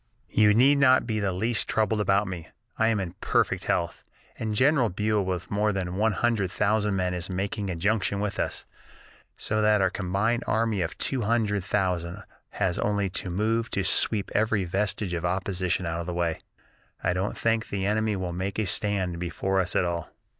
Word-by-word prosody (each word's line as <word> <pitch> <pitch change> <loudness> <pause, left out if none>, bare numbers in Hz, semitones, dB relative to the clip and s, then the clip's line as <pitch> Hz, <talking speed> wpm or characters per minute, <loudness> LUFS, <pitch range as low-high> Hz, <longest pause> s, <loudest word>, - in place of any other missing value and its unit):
"You 105 -1 +5
need 140 +5 +5
not 130 -2 +5
be 110 -2 -1
the 100 -2 0
least 110 +5 -1
troubled 110 -1 +1
about 100 0 +2
me. 90 -4 -6 0.3
I 110 - +2
am 115 -2 +2
in 90 -3 -4
perfect - - +1
health, 85 0 -1 0.4
and 110 -2 -2
General 130 0 +3
Buell 105 +2 0
with 90 -1 -4
more 105 +1 +2
than 95 -3 -3
one 110 +2 +2
hundred 110 -4 +1
thousand 105 +1 +1
men 90 -1 0
is 90 +1 -4
making 100 +2 -2
a 90 - -2
junction 100 +3 0
with 105 -1 -2
us; - - -2 0.7
so 110 0 -1
that 105 0 +4
our 95 -1 +2
combined 100 +5 0
army 110 -2 +1
of 85 +1 -3
two 130 -2 -1
hundred 105 -3 +1
thousand 95 -1 -1 0.3
has 95 -2 -1
only 100 -2 0
to 95 0 -4
move 110 +5 0
to 100 - -1
sweep 100 +4 +1
every 105 -1 +2
vestige 95 +1 -1
of 85 -1 -2
opposition 90 0 -1
out 85 0 -2
of 85 - -5
the 90 - -3
way, 85 -2 -1 0.6
I - - +2
don't 95 +3 -2
think 115 0 0
the 95 -1 -2
enemy 110 +1 +1
will 90 -2 -3
make 95 +2 -3
a 110 - +1
stand 95 -3 -1
before 95 +2 -1
us 90 -1 0
at - - +3
all." 85 -2 -3
100 Hz, 195 wpm, -26 LUFS, 90-110 Hz, 0.7 s, You